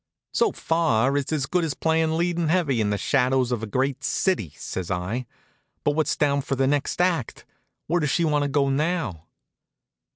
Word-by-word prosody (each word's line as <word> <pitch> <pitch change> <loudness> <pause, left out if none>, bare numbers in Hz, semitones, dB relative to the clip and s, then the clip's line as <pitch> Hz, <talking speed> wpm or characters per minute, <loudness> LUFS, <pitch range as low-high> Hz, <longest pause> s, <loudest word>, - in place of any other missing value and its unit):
"So - - +3
far 140 -6 +1
it's 145 0 -1
as 150 -3 0
good 175 +5 0
as 155 -4 -2
playin' 160 0 +1
leading 170 -1 0
heavy 155 -8 +2
in 105 - +1
'The 105 - 0
Shadows 130 +2 +1
of 120 -3 -1
a 110 - -4
Great 130 +5 -1
City,'" 135 - 0
says 90 -2 -5
I, 95 +7 -2 0.6
"but 145 - +3
what's 155 +1 0
down 140 -1 +2
for 135 0 -2
the 135 0 +1
next 145 +4 0
act? 175 -9 0 0.4
Where 175 +3 +1
does 150 -3 0
she 170 +4 +2
want 150 -2 +2
to 145 - +1
go 140 0 +2
now?" 150 - -1
140 Hz, 190 wpm, -24 LUFS, 125-160 Hz, 0.6 s, So